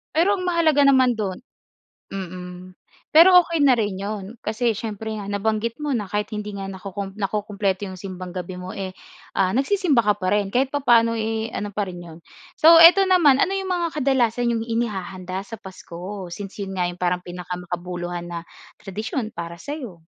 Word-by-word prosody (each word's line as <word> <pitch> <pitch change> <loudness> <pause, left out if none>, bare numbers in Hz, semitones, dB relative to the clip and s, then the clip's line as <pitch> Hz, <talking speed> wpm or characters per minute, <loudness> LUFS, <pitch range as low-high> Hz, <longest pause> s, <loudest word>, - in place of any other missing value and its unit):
Pero 350 +6 +4
ang 365 - -4
mahalaga 335 -4 +3
naman 260 -3 +5
dun 200 -5 -3 0.7
mm, 180 -1 -8 0.3
pero 360 +3 +8
okey 335 -2 -3
na 265 - +6
rin 210 -5 -1
yun 200 0 -4 0.2
kasi 230 +2 +1
siyempre 220 -1 -5
nga 205 - -6
nabanggit 215 +5 -2
mo 300 - -2
na 210 - -3
kahit 210 +2 -2
hindi 210 -1 -5
nga 195 -1 -5
nakukum 195 +1 -7
nakukumpleto 200 -1 -2
yung 185 - -8
Simbang 185 -1 -7
Gabi 180 0 -6
mo 180 0 -7
eh, 190 -1 -5 0.4
ah, 190 -1 +2
nagsisimba 275 - +2
ka 210 - +4
pa 185 - 0
rin 205 -1 0
kahit 265 +2 +2
papaano 235 -5 +3
eh, 220 0 -2
ano 205 -2 -5
pa 200 -1 -2
rin 180 - -8
yun. 160 -1 -11 0.4
So, 330 +2 +7
ito 335 +4 +9
naman, 300 -8 +5
ano - - +3
yung 385 - -3
mga 340 -3 -1
kadalasan 245 -4 +1
yung 225 - -1
inihahanda 190 -5 -3
sa 225 +3 -9
Pasko 190 0 -8
since 200 +3 -7
yun 195 -1 -5
nga 180 - +1
yung 175 0 -5
parang 180 0 0
pinakamakabuluhan 175 0 -5
na 170 -1 -4 0.4
tradisyon 215 +4 -4
para 170 0 -6
sa'yo? 215 - -8
205 Hz, 180 wpm, -23 LUFS, 185-245 Hz, 0.7 s, ito